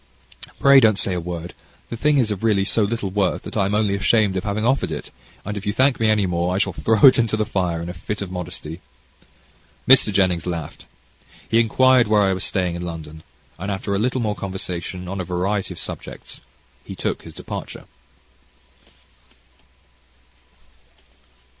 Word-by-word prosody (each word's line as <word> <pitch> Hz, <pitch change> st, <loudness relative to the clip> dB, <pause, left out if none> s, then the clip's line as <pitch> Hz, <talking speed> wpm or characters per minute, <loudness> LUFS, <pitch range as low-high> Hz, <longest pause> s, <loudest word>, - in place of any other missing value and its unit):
"Pray 140 Hz, 0 st, +7 dB
don't 110 Hz, -5 st, +4 dB
say 95 Hz, -, 0 dB
a 90 Hz, -, -1 dB
word; 85 Hz, 0 st, -6 dB, 0.4 s
the -, -, -3 dB
thing 150 Hz, +5 st, +2 dB
is 110 Hz, -5 st, +2 dB
really 105 Hz, -4 st, +2 dB
so 110 Hz, +3 st, +1 dB
little 105 Hz, -2 st, -1 dB
worth 95 Hz, -2 st, 0 dB
that -, -, -8 dB
I 100 Hz, -3 st, +2 dB
am 100 Hz, -, -1 dB
only 105 Hz, -2 st, +1 dB
ashamed 105 Hz, 0 st, +2 dB
of 95 Hz, -, -2 dB
having 105 Hz, +1 st, -2 dB
offered 125 Hz, -9 st, +1 dB
it, 75 Hz, -, -6 dB, 0.3 s
and 105 Hz, +1 st, -4 dB
if 100 Hz, 0 st, -6 dB
you 105 Hz, -, 0 dB
thank 130 Hz, +2 st, +2 dB
me 110 Hz, -1 st, +2 dB
any 105 Hz, -2 st, +3 dB
more 90 Hz, 0 st, -1 dB
I -, -, 0 dB
shall 100 Hz, -2 st, 0 dB
throw 110 Hz, +4 st, 0 dB
it 130 Hz, -, +8 dB
into 115 Hz, -2 st, +1 dB
the 110 Hz, -, 0 dB
fire 90 Hz, -4 st, -1 dB
in -, -, -6 dB
a 90 Hz, -, -5 dB
fit 100 Hz, +4 st, -5 dB
of 100 Hz, -2 st, -5 dB
modesty." 90 Hz, -2 st, -6 dB, 1.1 s
Mr. 130 Hz, -4 st, +6 dB
Jennings 90 Hz, -4 st, +1 dB
laughed. 85 Hz, -4 st, -6 dB, 0.6 s
He 115 Hz, -, +3 dB
inquired 125 Hz, +2 st, +4 dB
where 105 Hz, -1 st, +4 dB
I 95 Hz, -1 st, +2 dB
was 95 Hz, 0 st, -3 dB
staying 90 Hz, -3 st, 0 dB
in 85 Hz, -, -5 dB
London, 80 Hz, -3 st, -7 dB, 0.4 s
and 100 Hz, +3 st, -4 dB
after 100 Hz, 0 st, -3 dB
a 100 Hz, -, 0 dB
little 125 Hz, +3 st, 0 dB
more 105 Hz, -2 st, 0 dB
conversation 90 Hz, -2 st, -5 dB
on 95 Hz, +1 st, -4 dB
a -, -, -3 dB
variety 95 Hz, +3 st, -2 dB
of -, -, -8 dB
subjects, -, -, -8 dB, 0.4 s
he -, -, -8 dB
took -, -, -3 dB
his -, -, -12 dB
departure. -, -, -7 dB
100 Hz, 185 wpm, -21 LUFS, 90-110 Hz, 1.1 s, it